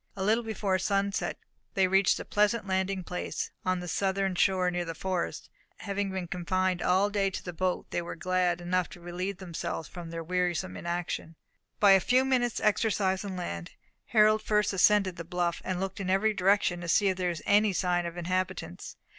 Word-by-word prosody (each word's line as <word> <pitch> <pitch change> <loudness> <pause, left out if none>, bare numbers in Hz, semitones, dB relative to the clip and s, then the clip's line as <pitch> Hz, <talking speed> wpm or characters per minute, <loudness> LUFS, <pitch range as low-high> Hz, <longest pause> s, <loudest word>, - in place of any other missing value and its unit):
A 190 - -3
little 220 +4 +2
before 205 -4 -1
sunset 200 +1 0 0.4
they 190 -1 +4
reached 190 +1 +3
a - - -6
pleasant 210 +1 +1
landing 190 0 -1
place, 180 +1 -4
on 185 -1 0
the 180 - -6
southern 195 +2 0
shore, 180 0 +2
near 175 0 -1
the 165 -1 -5
forest; 185 -1 -3 0.3
and - - -11
having 200 -1 -1
been 190 -1 -3
confined 185 0 -1
all 190 +3 +2
day 200 -1 +1
to 190 - -6
the 175 - -6
boat, 180 +2 -1
they - - -1
were 170 - -6
glad 180 0 0
enough 180 0 0
to - - -12
relieve 180 +3 -4
themselves 170 -3 -5
from 175 -2 -8
their 165 0 -5
wearisome 175 - -1
inaction, 170 - -4 0.4
by 205 -2 +7
a 195 - +8
few 250 +7 +3
minutes' 245 -3 +1
exercise 200 -3 +1
on 195 -2 -5
land. 85 - -5 0.3
Harold 215 -1 +4
first 210 -2 +1
ascended 195 -1 +3
the 170 - -5
bluff, 175 0 -2
and 185 -1 -2
looked 195 +2 -4
in 190 -2 -3
every 205 +3 +3
direction 195 -2 +2
to 170 - -5
see 200 +3 +4
if 185 - -1
there 180 -1 0
was 170 -3 -5
any 205 +1 +4
sign 175 -2 0
of 170 +1 -7
inhabitants. 185 - -3
185 Hz, 195 wpm, -29 LUFS, 175-200 Hz, 0.4 s, a